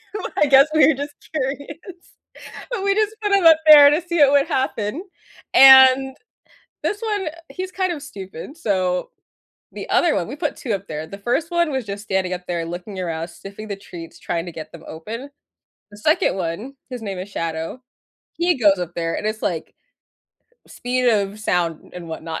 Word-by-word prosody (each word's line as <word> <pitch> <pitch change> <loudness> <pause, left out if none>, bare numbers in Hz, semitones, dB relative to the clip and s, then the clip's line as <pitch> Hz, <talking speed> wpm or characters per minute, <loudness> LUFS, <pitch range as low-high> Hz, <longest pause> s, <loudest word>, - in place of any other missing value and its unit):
Well, 415 - -4
I - - +4
guess 275 0 +6
we 300 -3 +6
were 320 - +5
just 285 +2 -6 0.2
curious, 285 +1 -4 0.9
and 445 - -2
we 395 0 +2
just 430 +1 0
put 415 - 0
him 395 -3 +3
up 325 -1 +8
there 290 -2 +10
to 300 - +2
see 345 -1 -3
what 280 -2 +7
would 285 -1 +4
happen, 260 - -2 0.5
and 265 0 +8 0.7
this 415 - -2
one, 410 -6 -2
uh, - - -9 0.2
he's 370 0 -6
kind 370 -2 -1
of 305 - -6
stupid, 195 - -9
so, 185 - -1 0.6
the - - -8
other - - +3
one - - -2
we - - -6
put - - -3
2 240 -6 -4
up 195 0 -3
there. 155 0 -5
The 200 +5 -10
1st 245 +10 -1
one 340 -3 +1
was 260 -3 -2
just 200 +1 -6
standing 190 -2 -1
up 180 0 -9
there 170 -1 -2
looking 180 +3 -7
around, 165 -2 -3
sniffing 200 +4 -10
the 200 - -3
treats, 175 -4 -11
trying 170 0 -3
to 175 - -7
get 155 - -9
them 170 - -12
open. 230 - -7 0.6
The 205 - -12
2nd 210 - +2
one- 190 +10 -4 0.2
his 250 - -6
name 195 -3 -5
is 190 +2 -6
Shadow,- 165 +7 -4 0.5
he 350 +1 +1
goes 200 -5 +4
up 175 -1 -5
there, 165 -1 -2
and - - -3
it's, 215 0 -3
like, 165 -3 -3 0.9
speed 250 0 -1
of 205 -2 0
sound 170 -5 -2
and 175 -2 -8
whatnot, 160 0 -5
220 Hz, 195 wpm, -21 LUFS, 180-290 Hz, 0.9 s, there